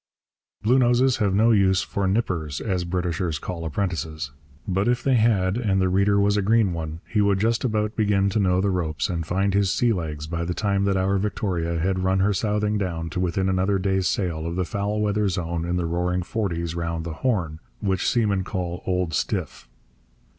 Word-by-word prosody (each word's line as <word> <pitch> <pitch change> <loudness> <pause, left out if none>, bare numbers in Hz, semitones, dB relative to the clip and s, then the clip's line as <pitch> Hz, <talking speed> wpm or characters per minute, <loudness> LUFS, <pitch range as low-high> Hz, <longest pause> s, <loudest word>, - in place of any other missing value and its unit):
Bluenoses 125 +2 +3
have 100 -4 +1
no 110 +3 +4
use 95 -3 +3
for 100 -1 -2
nippers, 90 - -1
as 90 -5 -2
Britishers 85 -2 -1
call 85 +4 -5
apprentices. 80 -4 -3 0.4
But 95 +2 0
if 125 0 +1
they 135 - +2
had, 110 -4 +2
and 100 -6 +1
the 95 -1 +2
reader 100 +2 +3
was 100 +1 +3
a - - +2
green 105 -2 +3
one, 80 0 -5
he 105 - +1
would 100 -1 +2
just 115 +2 +1
about 110 -3 0
begin 100 -2 +2
to 110 - 0
know 90 -2 +2
the 100 0 +1
ropes 85 +1 -1
and 85 -3 -3
find 95 +2 +1
his 100 -1 +2
sea 115 +4 +2
legs 75 -5 -4
by 85 +1 -3
the 90 +1 -3
time 100 -2 0
that 100 -1 +1
our 95 +1 +1
Victoria 95 -5 -1
had 95 +3 0
run 95 +1 +1
her 100 +2 +2
southing 105 +1 0
down 85 -4 -3
to 90 - -3
within 95 +1 0
another 95 +1 +1
day's 95 -1 0
sail 85 -4 -1
of 85 - -3
the 90 0 0
foul 105 +2 -2
weather 105 -1 +1
zone 85 -2 -2
in 85 +1 -1
the 90 -1 0
roaring 90 +2 -1
forties 85 -5 -2
round 85 -1 -3
the 85 - -4
Horn, 90 -11 0 0.2
which 95 -3 0
seamen 105 -5 +1
call 90 -2 -4
'Old 90 -3 0
Stiff.' - - -2
95 Hz, 200 wpm, -24 LUFS, 85-105 Hz, 0.4 s, no